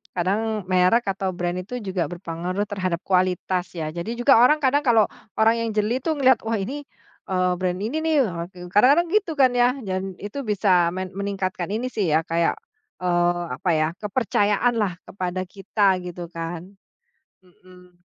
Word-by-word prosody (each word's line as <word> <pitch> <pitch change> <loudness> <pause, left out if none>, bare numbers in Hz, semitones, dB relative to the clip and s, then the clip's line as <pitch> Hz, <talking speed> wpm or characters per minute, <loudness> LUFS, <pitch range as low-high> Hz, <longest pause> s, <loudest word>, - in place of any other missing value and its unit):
kadang 210 +4 -1
merek, 185 +6 +4
atau 190 -1 -2
brand, 175 0 -2
itu 240 +7 -6
juga 190 -4 -2
berpengaruh 175 +2 -4
terhadap 185 -4 -2
kualitas, 185 -1 +1
ya? 160 -2 -3
Jadi, 175 +8 -4
juga 270 +2 +6
orang 300 +6 +5
kadang 285 +1 +2
kalau 225 -3 +4 0.3
orang 225 +1 +3
yang - - -2
jeli 215 +3 +1
tuh, 315 +4 -1
ngelihat, 260 -3 +4
"Wah, 225 - -1
ini, 270 +9 -4 0.4
eee, 185 -1 +1
brand 180 0 -1
ini 230 +9 -2
nih!" 320 0 0
Ah 170 -1 -4
gu 180 0 -11
kadang-kadang 280 - +5
gitu 415 -5 +1
kan, 265 -3 +4
ya? 245 +1 +4
Dan 190 -1 -3
itu 245 +7 -5
bisa 185 -5 +2
men 185 0 -4
meningkatkan 195 -2 -2
ini 250 +3 -2
sih 185 -8 0
ya, 160 - +4
kayak, 165 0 0 0.5
eee, 175 -1 +1
apa 185 - -2
ya, 155 -1 +2
kepercayaan 210 +1 +1
lah, 200 -4 0
kepada 185 -1 -4
kita 195 -1 +1
gitu, 175 -1 -7
kan? 165 0 -5 0.8
Mhm. 180 0 -20
190 Hz, 170 wpm, -23 LUFS, 180-225 Hz, 0.8 s, juga